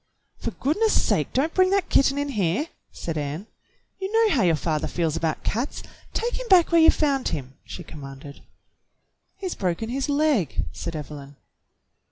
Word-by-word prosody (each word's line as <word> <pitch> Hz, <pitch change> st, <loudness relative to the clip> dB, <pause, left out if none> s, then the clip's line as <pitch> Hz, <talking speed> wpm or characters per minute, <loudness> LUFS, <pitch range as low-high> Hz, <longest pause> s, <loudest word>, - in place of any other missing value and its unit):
"For -, -, -2 dB
goodness 415 Hz, -, +1 dB
sake, -, -, +1 dB
don't 300 Hz, +5 st, +1 dB
bring 370 Hz, 0 st, +4 dB
that 395 Hz, -1 st, +1 dB
kitten 275 Hz, 0 st, +4 dB
in 285 Hz, 0 st, -1 dB
here!" 210 Hz, -, 0 dB, 0.2 s
said 160 Hz, -2 st, -4 dB
Ann. 150 Hz, +6 st, -4 dB, 0.5 s
"You 385 Hz, +1 st, -3 dB
know 450 Hz, -2 st, +4 dB
how 255 Hz, -, +3 dB
your 170 Hz, -4 st, +4 dB
father 155 Hz, -1 st, -1 dB
feels 165 Hz, -3 st, -1 dB
about 160 Hz, -1 st, -1 dB
cats. 240 Hz, +7 st, -2 dB, 0.3 s
Take 475 Hz, +2 st, -2 dB
him -, -, -6 dB
back 360 Hz, -5 st, +6 dB
where 335 Hz, -1 st, +6 dB
you 320 Hz, -, +8 dB
found 280 Hz, -4 st, +2 dB
him," 135 Hz, -3 st, -4 dB
she 180 Hz, -, -8 dB
commanded. 140 Hz, -2 st, -10 dB, 1.0 s
"He's 380 Hz, -3 st, -3 dB
broken 190 Hz, +4 st, -2 dB
his 270 Hz, +4 st, -2 dB
leg," 285 Hz, -, +1 dB
said 165 Hz, -, -5 dB
Evelyn. 145 Hz, -2 st, -8 dB
250 Hz, 170 wpm, -25 LUFS, -, 1.0 s, you